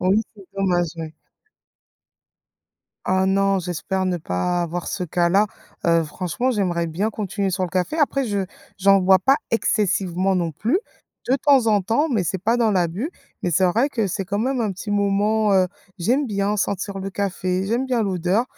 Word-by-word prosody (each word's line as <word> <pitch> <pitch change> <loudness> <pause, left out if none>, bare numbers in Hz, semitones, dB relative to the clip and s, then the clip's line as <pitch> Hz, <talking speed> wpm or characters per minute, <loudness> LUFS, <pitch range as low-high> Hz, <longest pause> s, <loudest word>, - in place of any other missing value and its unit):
oui 190 +4 +3 0.2
c'est 200 - -13
dommage, 180 -3 +1
oui. 160 -1 -6 1.9
Ah 190 0 +2
non 195 0 +2
j'espère 180 +2 -2
ne 180 -1 0
pas 160 - -1
avoir 175 0 -3
ce 180 - -3
cas-là. 180 +4 +2 0.4
Heu, 165 -1 +3
franchement 180 +10 -2
j'aimerais 180 -7 0
bien 175 +7 -1
continuer 200 -2 -2
sur 185 0 -1
le 180 - -5
café. 185 - -1
Après 275 -3 +1
je 205 -2 -1 0.4
j'en 195 +1 +5
bois 190 0 +5
pas 270 +6 +3
excessivement 195 -4 +1
non 170 -2 -1
plus. 235 - 0 0.5
De 255 - +3
temps 275 -3 +4
en 210 -2 +4
temps 230 - +1
mais 215 -7 +1
c'est 190 - -1
pas 230 +3 +2
dans 225 -2 +3
l'abus, 185 - 0 0.3
mais 175 - 0
c'est 185 +3 +3
vrai 230 +10 +2
que 230 -7 -1
c'est 195 +1 -3
quand 200 +1 -2
même 255 +3 0
un 215 -3 0
petit 190 +3 -7
moment, 205 +1 +2
heu, 185 -1 +4 0.3
j'aime 255 +11 +1
bien 205 -1 -1
sentir 200 0 -2
le 195 - -4
café, 190 -1 -2
j'aime 235 +5 0
bien 250 -3 +1
l'odeur, 190 +2 +1
195 Hz, 180 wpm, -22 LUFS, 180-220 Hz, 1.9 s, j'en